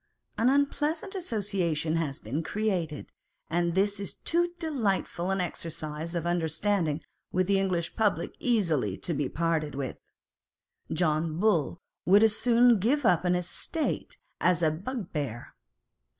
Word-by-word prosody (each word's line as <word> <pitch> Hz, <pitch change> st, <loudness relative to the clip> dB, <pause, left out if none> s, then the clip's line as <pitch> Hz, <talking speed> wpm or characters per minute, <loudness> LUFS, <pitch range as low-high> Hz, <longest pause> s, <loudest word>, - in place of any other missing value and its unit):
An 235 Hz, +3 st, +3 dB
unpleasant 295 Hz, +5 st, +1 dB
association 195 Hz, -, -1 dB
has 150 Hz, -5 st, -1 dB
been 130 Hz, +9 st, -3 dB
created, 180 Hz, -6 st, -2 dB, 0.4 s
and 170 Hz, 0 st, +1 dB
this 200 Hz, +1 st, +2 dB
is 200 Hz, -, -6 dB
too 345 Hz, +1 st, 0 dB
delightful 220 Hz, -, -1 dB
an 195 Hz, 0 st, +1 dB
exercise 165 Hz, -1 st, -4 dB
of 170 Hz, -, -1 dB
the 170 Hz, -, -1 dB
understanding 165 Hz, -1 st, 0 dB, 0.3 s
with 185 Hz, 0 st, +2 dB
the 195 Hz, +1 st, +3 dB
English 180 Hz, -3 st, -1 dB
public 215 Hz, -3 st, +1 dB
easily 165 Hz, -, +1 dB
to 170 Hz, -, -3 dB
be 145 Hz, -2 st, -1 dB
parted 160 Hz, -3 st, -1 dB
with. 135 Hz, -2 st, -4 dB, 0.9 s
John 160 Hz, -1 st, +1 dB
Bull 185 Hz, -7 st, +2 dB, 0.3 s
would 200 Hz, +4 st, +6 dB
as 220 Hz, -1 st, +5 dB
soon 240 Hz, -1 st, +5 dB
give 255 Hz, +7 st, +1 dB
up 180 Hz, -3 st, +4 dB
an 180 Hz, 0 st, +3 dB
estate 180 Hz, -, -2 dB, 0.2 s
as 180 Hz, -1 st, +3 dB
a 155 Hz, -, +4 dB
bugbear. 155 Hz, -, -4 dB
180 Hz, 135 wpm, -28 LUFS, 160-215 Hz, 0.9 s, would